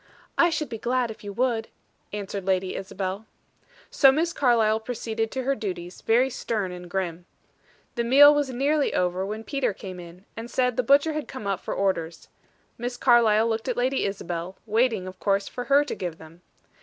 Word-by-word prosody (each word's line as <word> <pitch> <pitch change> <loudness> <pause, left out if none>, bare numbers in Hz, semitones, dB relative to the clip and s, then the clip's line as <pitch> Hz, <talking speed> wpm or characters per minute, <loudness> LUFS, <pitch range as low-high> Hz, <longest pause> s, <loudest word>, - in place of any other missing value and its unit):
"I 340 - +5
should 315 -2 -2
be 225 - -6
glad 245 0 0
if 215 - -12
you 205 - -6
would," 235 -1 0 0.4
answered 200 -1 -5
Lady 190 0 0
Isabel. 195 +2 -5 0.6
So 270 -2 +6
Miss 330 +5 0
Carlyle 225 -5 +3
proceeded 225 -1 -3
to 260 +2 -4
her 275 +2 +1
duties, 180 -7 -6
very 240 +4 +3
stern 215 -6 -2
and 180 0 -9
grim. 175 -2 -3 0.7
The 235 - -1
meal 285 +5 +8
was 290 -2 0
nearly 280 +4 +1
over, 180 +1 0
when 215 +2 -5
Peter 275 -3 -1
came 185 -1 -8
in, 175 +2 -12
and 230 +2 -7
said 250 -1 +1
the 250 - +2
butcher 285 +5 +4
had 305 -1 -4
come 260 -6 -8
up 195 -2 -1
for - - -5
orders. 170 -4 -2 0.5
Miss 245 +1 -4
Carlyle 230 -3 +4
looked 225 +1 -2
at 250 - -1
Lady 260 +2 +1
Isabel, 180 -2 -5
waiting, 220 -2 +1
of 185 0 -9
course, 195 -1 +1
for 245 - -6
her 285 +1 +4
to - - -4
give 175 -3 -5
them. 160 +2 -15
225 Hz, 190 wpm, -25 LUFS, 190-255 Hz, 0.7 s, meal